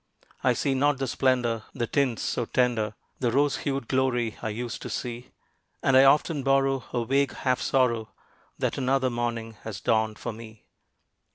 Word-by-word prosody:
I - - +4
see 140 - 0
not 140 +1 +2
the 135 - -1
splendor, 125 -3 +1
the 120 -3 -1
tints 130 -2 0
so 120 - -1
tender, 115 -4 0 0.2
The 120 -3 +1
rose 145 +3 +2
hued 135 -4 -3
glory 125 -4 +1
I 110 - -2
used 115 +2 -5
to - - -6
see; 120 0 -5 0.5
And 135 - +3
I 135 +1 +8
often 150 +2 +3
borrow 135 -1 +2
a 120 -2 -1
vague 140 +2 +1
half 130 -1 0
sorrow 115 -4 +1 0.5
That - - -1
another 130 0 +1
morning 115 -2 -3
has 110 -3 -6
dawned 110 -1 +1
for - - -5
me. 110 -1 -12
125 Hz, 170 wpm, -26 LUFS, 115-135 Hz, 0.5 s, I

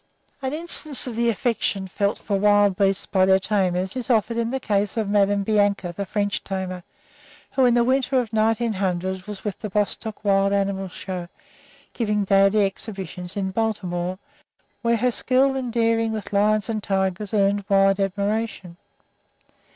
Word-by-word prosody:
An 265 -1 -2
instance 310 -2 -1
of 245 -3 -5
the 235 +1 +2
affection 220 -4 -1
felt 200 +2 0
for 200 -2 -2
wild 205 -1 +4
beasts 195 0 +1
by 190 -1 +2
their 190 0 +5
tamers 190 -1 -1
is 255 0 -5
offered 230 -1 +2
in 230 0 -1
the 265 +2 -2
case 205 -3 -1
of 220 -2 0
Madame 200 0 +2
Bianca, 205 -4 +1
the 200 +1 -4
French 205 -1 -1
tamer, 185 -2 -4 0.7
who 265 - +3
in 240 -1 +4
the 240 - +4
winter 260 +1 +2
of 230 -4 -4
1900 195 -4 0
was 210 -2 -7
with 205 -3 -4
the 215 - -5
Bostock 210 +2 -2
Wild 195 0 +3
Animal 195 -1 0
Show 180 -1 -6 0.7
giving 210 -3 0
daily 195 +1 +4
exhibitions 190 -2 -6
in 190 -1 -1
Baltimore, 185 -4 -2 0.6
where 235 -1 +2
her 250 +2 +1
skill 265 +3 +2
and 255 -3 -3
daring 230 -1 +1
with 215 -1 -5
lions 210 +1 +2
and 220 -2 -2
tigers 190 0 -1
earned 200 -1 +2
wide 195 0 +4
admiration. 200 -2 -2
205 Hz, 160 wpm, -23 LUFS, 195-225 Hz, 0.7 s, their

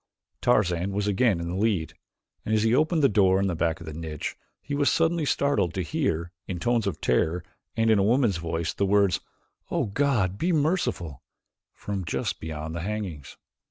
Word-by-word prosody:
Tarzan 95 -5 +2
was 100 +1 -1
again 105 -1 +2
in 85 - -4
the 85 - -3
lead, 100 -5 0 0.5
and 110 - 0
as 110 - +2
he 115 +1 +3
opened 155 +3 +2
the - - +8
door 95 -4 +3
in 100 - +1
the 95 - 0
back 80 0 0
of 85 - -9
the 80 - -7
niche, 80 -1 -5 0.2
he 145 - -7
was 145 0 +3
suddenly 165 -1 +2
startled 140 -12 +1
to 95 - -1
hear, 80 +2 -1 0.2
in 90 - -3
tones 120 +4 +1
of - - -3
terror 85 +2 +1 0.3
and 115 0 +3
in 110 - +4
a - - +3
woman's 115 -3 +3
voice, 80 0 -2
the 100 - 0
words: 100 -1 +3 0.5
"O - - 0
God, 105 -5 0
be 180 - +1
merciful" 145 - 0 0.5
from 100 -2 -4
just 80 - -2
beyond 80 0 -5
the 85 - -4
hangings. 95 -7 -5
100 Hz, 195 wpm, -26 LUFS, 85-120 Hz, 0.5 s, the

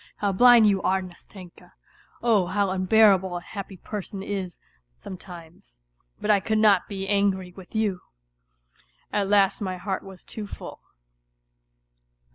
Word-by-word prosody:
How 200 -1 0
blind 240 +3 +6
you 200 -2 +2
are, 190 +1 +1
Nastenka!... 180 0 -13 0.5
Oh, 215 -7 +3
how 195 +1 0
unbearable 190 -1 +3
a - - -7
happy 195 +1 -8
person 195 0 -7
is 195 -3 -5 0.4
sometimes! 170 - -12 0.4
But 215 - +1
I 205 - +4
could 220 +3 -1
not 210 -4 +4
be 195 -1 -5
angry 195 -2 +1
with 190 +2 -14
you! 205 -4 0 0.6
") - - -37 0.3
At 200 -2 0
last 200 -1 +3
my 185 -2 -3
heart 190 +1 -3
was 190 -2 -13
too 210 -2 -7
full. - - -9
195 Hz, 140 wpm, -25 LUFS, 185-205 Hz, 0.6 s, blind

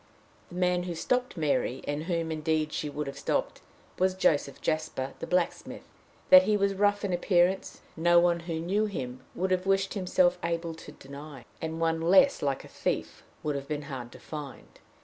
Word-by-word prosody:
The 175 - -11
man 180 0 +1
who 175 -2 -4
stopped 250 +6 -1
Mary, 145 -4 0
and 145 +2 -2
whom, 165 -2 -1
indeed, 155 -1 -1
she 150 - -2
would 150 +1 -4
have 140 - -7
stopped, - - -1 0.4
was 185 0 +2
Joseph 145 -7 +1
Jasper, 155 -4 -2
the - - -5
blacksmith. 180 0 -1 0.5
That 275 0 +11
he 215 -6 +2
was 200 0 +1
rough 205 +1 +2
in 190 - -1
appearance, 180 +1 +1
no 175 +1 +5
one 170 0 +3
who 165 0 -5
knew 200 +6 0
him 130 -10 -5
would 185 +1 -1
have 185 +1 0
wished 195 0 +2
himself 180 -2 +2
able 170 0 -2
to 160 - -11
deny, 140 -2 -11 0.2
and 160 0 -4
one 165 0 +1
less 190 +11 +5
like 140 -2 -1
a - - -11
thief - - -3 0.2
would 150 - 0
have 140 -1 -5
been 150 0 -3
hard 120 -2 -6
to - - -12
find. 150 -4 -9
170 Hz, 190 wpm, -28 LUFS, 150-185 Hz, 0.5 s, That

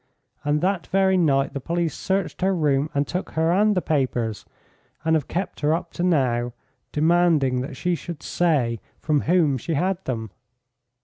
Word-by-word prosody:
And 145 +1 +1
that 190 0 0
very 190 0 +3
night 140 -6 +2
the 140 - -3
police 170 +3 -1
searched 190 -1 -2
her 190 +1 +2
room 145 -3 +1
and 140 0 +2
took 180 +1 -4
her 160 +1 +2
and 210 +3 +3
the 180 - +1
papers, 125 -7 -1 0.6
and 160 0 +3
have 150 -4 0
kept 185 +3 -3
her 150 +2 +2
up 170 0 -6
to - - -4
now, 125 -9 +1 0.4
demanding 155 -5 +3
that 130 0 -6
she 180 0 0
should 170 -2 -6
say 135 -10 +1 0.2
from 150 -3 +1
whom 155 -6 +2
she 165 +6 -2
had 185 +4 0
them." 110 -5 -3
160 Hz, 175 wpm, -23 LUFS, 135-175 Hz, 0.6 s, very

